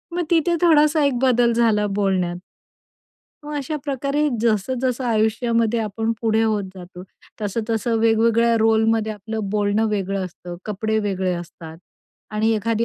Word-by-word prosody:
मग 355 - 0
तिथे 340 +1 +3
थोडासा 310 -2 +4
एक 275 -3 +1
बदल 245 -2 +3
झाला 225 -3 +2
बोलण्यात. 185 -3 0 1.1
मग 300 0 -6
अशा 290 +2 -3
प्रकारे 280 +1 0
जसं-जसं 245 +3 0
आयुष्यामध्ये 230 0 +1
आपण 220 +1 -2
पुढे 225 -1 +2
होत 215 -2 0
जातो, 180 -1 -11 0.4
तसं-तसं 225 +2 -1
वेगवेगळ्या 230 +1 +3
रोलमध्ये 220 0 +2
आपलं 215 0 -5
बोलणं 210 +1 +1
वेगळं 195 -2 -2
असतं, 175 0 -9
कपडे 220 +1 -1
वेगळे 190 -3 -1
असतात 170 -2 -9 0.5
आणि 215 +1 +1
एखादी 225 +2 0
220 Hz, 130 wpm, -21 LUFS, 205-235 Hz, 1.1 s, थोडासा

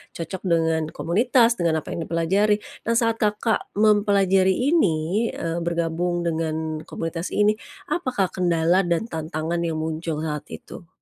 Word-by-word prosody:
cocok 170 +2 -5
dengan 160 -2 +1
komunitas, 235 +5 +2
dengan 160 -3 +1
apa - - -8
yang 165 - -4
dipelajari. 190 +6 +2 0.3
Nah, 230 - +2
saat 230 -1 +1
Kakak 210 +1 0
mempelajari 205 - +3
ini, 195 - +2
eee, 165 0 -3
bergabung 170 +1 -1
dengan 160 -1 -2
komunitas 165 +1 -4
ini, 210 +1 +4 0.4
apakah 255 - 0
kendala 175 0 +2
dan 175 +7 -1
tantangan 160 +1 -3
yang 165 -1 -1
muncul 160 0 -3
saat 150 -2 -4
itu? 170 - -10
170 Hz, 135 wpm, -23 LUFS, 160-205 Hz, 0.4 s, ini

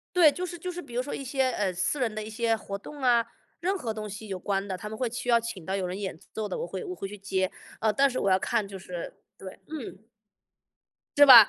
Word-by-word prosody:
对， 335 -4 +9
就 365 - -3
是 345 -1 -5
就 360 +2 -3
是 355 0 -5
比 245 -4 -11
如 250 - +2
说 285 - -4
一 - - -3
些， 265 +1 +1
呃， 200 -5 +1
私 190 +10 0
人 230 -4 +2
的 215 - -3
一 215 - -6
些 225 0 +2
活 200 -2 -5
动 290 +8 -9
啊， 240 -3 +5 0.4
任 380 +3 +1
何 225 -7 -2
东 215 -1 -4
西 210 +2 -7
有 190 - -2
关 195 +1 0
的， 190 -2 -2
他 210 - -6
们 215 0 -6
会 255 - +1
需 245 +1 -4
要 235 - +7
请 225 -7 -5
到 190 +3 0
有 190 - 0
人 180 +2 -3
演 190 -5 -3
奏 215 -1 -2
的， - - -3
我 485 - -2
会 - - -4
我 365 - -4
会 195 - -4
去 210 - -7
接， 190 -1 0 0.3
呃， 220 -1 +4
但 275 +5 +5
是 255 - -2
我 195 - +2
要 185 - +6
看 220 +2 +1
就 195 -1 -7
是 180 -2 -5 0.3
对， 190 -1 -8
嗯。 250 - -6 1.2
是 290 - +10
吧？ 235 -5 +12
220 Hz, 295 characters per minute, -29 LUFS, 195-265 Hz, 1.2 s, 吧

